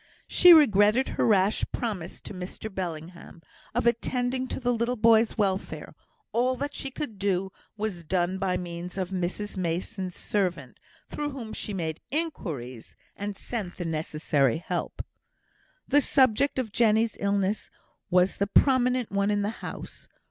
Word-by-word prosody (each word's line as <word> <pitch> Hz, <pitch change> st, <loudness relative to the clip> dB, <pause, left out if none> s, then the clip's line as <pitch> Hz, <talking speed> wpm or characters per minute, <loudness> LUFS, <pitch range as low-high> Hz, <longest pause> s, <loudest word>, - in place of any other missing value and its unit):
She 360 Hz, -, +7 dB
regretted 235 Hz, -, +6 dB
her -, -, 0 dB
rash 200 Hz, -1 st, +3 dB
promise 195 Hz, -8 st, -4 dB
to -, -, -9 dB
Mr 185 Hz, +3 st, -7 dB
Bellingham, 170 Hz, -1 st, -6 dB, 0.3 s
of 240 Hz, -, +1 dB
attending 245 Hz, +2 st, 0 dB
to -, -, -4 dB
the 245 Hz, -1 st, +1 dB
little 235 Hz, +2 st, 0 dB
boy's 225 Hz, 0 st, +4 dB
welfare; 195 Hz, -3 st, -1 dB, 0.4 s
all 250 Hz, +2 st, +2 dB
that 285 Hz, +3 st, -4 dB
she 270 Hz, -, -4 dB
could 265 Hz, -6 st, -6 dB
do 190 Hz, -1 st, 0 dB, 0.3 s
was 205 Hz, -5 st, -3 dB
done 180 Hz, +2 st, 0 dB
by 185 Hz, -2 st, 0 dB
means 175 Hz, +1 st, -6 dB
of 185 Hz, -1 st, -2 dB
Mrs 190 Hz, +3 st, -3 dB
Mason's 180 Hz, +1 st, -3 dB
servant, 195 Hz, -4 st, -2 dB, 0.3 s
through 295 Hz, 0 st, -3 dB
whom 245 Hz, -6 st, -7 dB
she -, -, -5 dB
made 165 Hz, -5 st, -3 dB
inquiries, 160 Hz, -, -4 dB, 0.2 s
and 205 Hz, 0 st, -4 dB
sent 200 Hz, -4 st, -5 dB
the 175 Hz, -, -4 dB
necessary 155 Hz, -4 st, 0 dB
help. 175 Hz, +1 st, -4 dB, 0.8 s
The 290 Hz, -, +5 dB
subject 270 Hz, 0 st, +3 dB
of 245 Hz, -5 st, -2 dB
Jenny's 225 Hz, 0 st, +3 dB
illness 200 Hz, 0 st, 0 dB, 0.4 s
was 180 Hz, +1 st, +3 dB
the 200 Hz, -, 0 dB
prominent 250 Hz, +1 st, +3 dB
one 200 Hz, 0 st, +1 dB
in 205 Hz, -1 st, +1 dB
the 205 Hz, -, -1 dB
house. -, -, -8 dB
205 Hz, 150 wpm, -27 LUFS, 180-240 Hz, 0.8 s, She